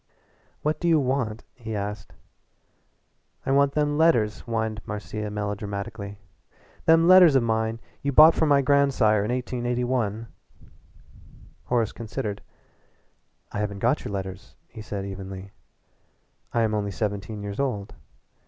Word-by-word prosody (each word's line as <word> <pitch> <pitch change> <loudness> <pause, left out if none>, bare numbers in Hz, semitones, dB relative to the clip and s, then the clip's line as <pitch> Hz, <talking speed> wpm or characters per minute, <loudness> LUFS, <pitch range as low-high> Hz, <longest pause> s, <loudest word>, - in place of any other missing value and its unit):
"What 155 +1 0
do 175 - -1
you 165 -2 +5
want?" 125 -5 -1
he 115 -3 -6
asked. 105 +1 -5 1.3
"I - - 0
want 140 0 +3
them 150 0 0
letters," 120 -11 +3
whined 110 -1 -2
Marcia 105 0 -5
melodramatically 100 0 -5 0.7
"them 165 +1 +5
letters 180 -5 +8
of 130 - +4
mine 110 0 0 0.2
you 140 - -1
bought 155 +4 +8
from 160 - +1
my 140 -1 +4
grandsire 130 -7 +3
in 105 - -3
1881." 125 -3 -1 1.4
Horace 115 -3 +1
considered. 110 -2 -5 1.1
"I - - -4
haven't 105 -1 -2
got 120 +8 +1
your - - -5
letters," 95 -2 -6
he 110 - -10
said 100 -2 -5
evenly. 95 0 -7 1.0
"I 115 - +1
am 110 -1 0
only 105 -1 -1
seventeen 100 +1 -4
years 100 0 -5
old. 105 -8 -2
110 Hz, 130 wpm, -25 LUFS, 105-135 Hz, 1.4 s, letters